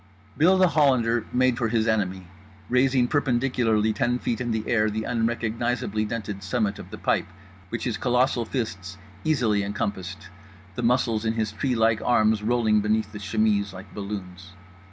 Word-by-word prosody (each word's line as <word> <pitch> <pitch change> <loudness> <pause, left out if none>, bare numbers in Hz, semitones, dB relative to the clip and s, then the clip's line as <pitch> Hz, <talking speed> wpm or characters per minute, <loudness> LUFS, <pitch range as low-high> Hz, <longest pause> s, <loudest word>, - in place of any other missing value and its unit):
Bill 180 +5 +4
The 185 -1 +5
Hollander 120 -7 +2
made 125 -1 +2
for 120 - +1
his 110 0 +1
enemy, 95 -4 0 0.4
raising 125 0 +3
perpendicularly 120 -6 +1
ten 120 +3 0
feet 120 -1 -2
in 110 -3 -2
air 110 -2 +2
the 110 +1 -3
unrecognisably 115 -1 -1
dented 105 -3 -5
summit 105 -4 -1
of - - -10
the - - -8
pipe - - 0 0.4
which 115 - -4
his 120 - -2
colossal 125 -1 +1
fists 100 -7 -4 0.3
easily 125 -10 +2
encompassed, 100 -2 -4 0.4
the 110 - -4
muscles 115 -2 +1
in 110 0 0
his 110 -2 -1
treelike 115 -2 +1
arms 110 -3 +3
rolling 110 -1 +2
beneath 105 0 0
the 105 - -8
chemise 105 -1 0
like 95 +2 -11
balloons. 95 -3 -7
110 Hz, 155 wpm, -25 LUFS, 105-125 Hz, 0.4 s, The